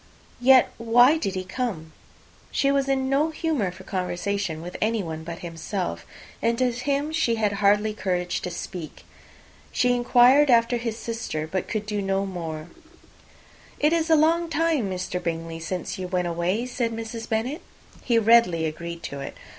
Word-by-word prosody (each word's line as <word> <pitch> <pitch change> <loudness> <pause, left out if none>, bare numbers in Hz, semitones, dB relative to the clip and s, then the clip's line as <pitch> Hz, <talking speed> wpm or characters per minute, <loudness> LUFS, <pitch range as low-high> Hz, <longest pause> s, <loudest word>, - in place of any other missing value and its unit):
"Yet 255 +1 +6
why 245 +6 +5
did 195 -11 -2
he 185 - -2
come?" 190 -6 -4 0.6
She 275 - +1
was 275 -1 +1
in 265 -1 +1
no 280 +4 +2
humour 310 - -1
for 185 +1 -11
conversation 185 -1 -2
with 175 +2 -8
anyone 195 -8 -1
but 170 +1 -6
himself; 165 - -4 0.3
and 230 0 +1
to 255 0 +2
him 280 +5 -1
she 280 -8 +1
had 215 -2 +1
hardly 205 +1 +2
courage 180 -4 -2
to - - -4
speak. 175 -1 -7 0.7
She 250 0 +2
inquired 250 +4 +5
after 235 0 +4
his 230 -1 -3
sister, 225 -10 -4
but 185 +3 -3
could 215 -2 -3
do 210 -1 -2
no 195 0 0
more. 165 -4 -6 1.1
"It 300 +2 +3
is 330 -1 +1
a 320 - +6
long 330 +2 +3
time, 320 -8 +1
Mr. 180 -1 -3
Bingley, 165 -1 -4
since 180 +3 -4
you 185 - -3
went 180 -1 -1
away," 175 +7 -1
said 240 -2 -2
Mrs. 225 0 -6
Bennet. 245 +9 -1 0.4
He 235 -2 +2
readily 225 -7 +4
agreed 170 +2 -5
to 140 - -5
it. 140 - -7
215 Hz, 165 wpm, -25 LUFS, 180-250 Hz, 1.1 s, Yet